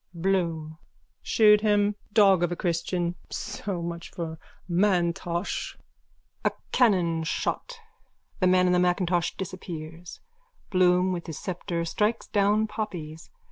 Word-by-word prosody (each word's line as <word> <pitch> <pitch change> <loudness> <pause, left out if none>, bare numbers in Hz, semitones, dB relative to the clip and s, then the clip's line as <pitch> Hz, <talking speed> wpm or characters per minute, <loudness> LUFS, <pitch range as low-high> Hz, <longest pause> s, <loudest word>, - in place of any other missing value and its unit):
BLOOM: 165 -3 -1 0.4
Shoot 210 -1 +5
him! 205 -1 +3 0.2
Dog 200 -4 +5
of 175 0 +1
a - - -1
christian! 170 0 -1 0.2
So 185 -4 -4
much 170 0 -5
for 160 -2 -6 0.3
M'Intosh! 175 -1 0 0.7
_(A - - +3 0.2
cannonshot. 180 - +1 0.6
The 185 - +3
man 185 0 +4
in 180 - +3
the 180 - +4
macintosh 175 -1 +1
disappears. 170 -2 -7 0.5
Bloom 185 0 +4
with 175 -2 -4
his 160 - -5
sceptre 175 -2 -3
strikes 210 +7 0
down 210 +1 +2
poppies. 175 -8 -6
180 Hz, 115 wpm, -27 LUFS, 170-200 Hz, 0.7 s, Shoot